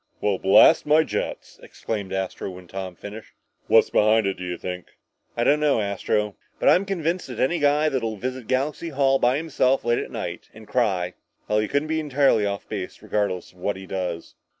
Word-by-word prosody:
"Well, 100 -3 0
blast 95 +8 +6
my 155 +2 +5
jets!" - - -5
exclaimed 100 -4 -5
Astro, 95 0 -3
when 90 -1 -11
Tom 95 0 -6
had - - -35
finished. 105 +2 -9 0.3
"What's - - +5
behind 110 0 +4
it, 95 - +1
do 90 - -8
you 90 -1 -4
think?" 90 -1 -6 0.5
"I 120 - +2
don't 150 +4 +4
know, 150 -5 +2
Astro. 105 0 -1 0.2
But - - +4
I'm 190 - +4
convinced 180 -2 -2
that 125 -4 -7
any 165 +7 +1
guy 145 +1 +3
that'll 115 -7 -1
visit 125 +1 -5
Galaxy 140 +5 -1
Hall 135 -2 +2
by 125 +3 +3
himself 135 -5 +1
late 120 0 +2
at - - -5
night - - -6
and 110 -1 -13
cry 95 -8 0 0.3
well, 105 - +2
he 105 - 0
couldn't 145 +5 0
be 160 0 0
entirely 140 -8 +2
off 100 -1 -4
base, - - -6
regardless 100 -4 -2
of 90 - -23
what 100 +2 -2
he 95 - -9
does." 90 -3 -4
110 Hz, 200 wpm, -24 LUFS, 95-140 Hz, 0.5 s, blast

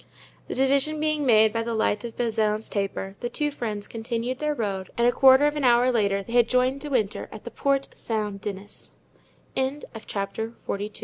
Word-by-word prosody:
The - - -4
division 275 +3 +2
being 305 -2 0
made 220 -2 +5
by 230 - 0
the 230 0 -2
light 220 -1 +1
of 235 -1 -7
Bazin's 220 -2 0
taper, 195 -1 -3
the 240 - -3
two 295 +4 -1
friends 215 -7 -4
continued 235 +2 -3
their 300 -1 -1
road 195 -6 -3
and 235 0 +4
a - - +5
quarter 265 +2 +6
of 295 0 +1
an 295 - -2
hour 245 0 +5
later 200 -4 +1
they 230 - -9
had 240 -1 +4
joined 255 +2 +2
De 295 - -5
Winter 220 -7 -1
at 215 - -10
the 235 - -7
Porte 275 -1 0
Saint 210 -3 -3
Denis. 205 0 -8 1.1
Chapter 205 +3 -3
XLIII. 205 +1 -3
235 Hz, 190 wpm, -25 LUFS, 210-265 Hz, 1.1 s, quarter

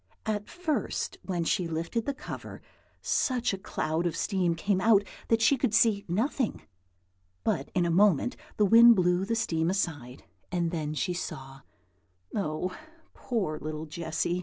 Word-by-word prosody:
At 210 -2 -2
first, 315 - -2
when 175 -3 -2
she 170 +1 0
lifted 165 - -3
the 280 - 0
cover, - - -8 0.4
such 250 -5 +1
a - - -2
cloud 165 -3 -1
of 165 - -3
steam 180 -4 0
came 190 +2 0
out 205 -1 +5 0.2
that 225 0 +2
she 270 +4 +5
could 220 -3 +1
see 215 -4 +3
nothing; 225 - -1 0.8
but 135 - -1
in 180 -1 +3
a 170 - +1
moment 195 - +3 0.2
the 210 - +4
wind 230 +3 +8
blew 180 0 +2
the 230 +3 -1
steam 170 -8 0
aside, 145 -10 -3 0.3
and 170 -2 0
then 155 -3 -3
she 180 +4 -1
saw, 135 -6 -6 0.7
oh, 180 -1 -2 0.4
poor 190 -11 -2
little 155 0 -5
Jessy! 165 +2 -2
185 Hz, 155 wpm, -28 LUFS, 165-220 Hz, 0.8 s, wind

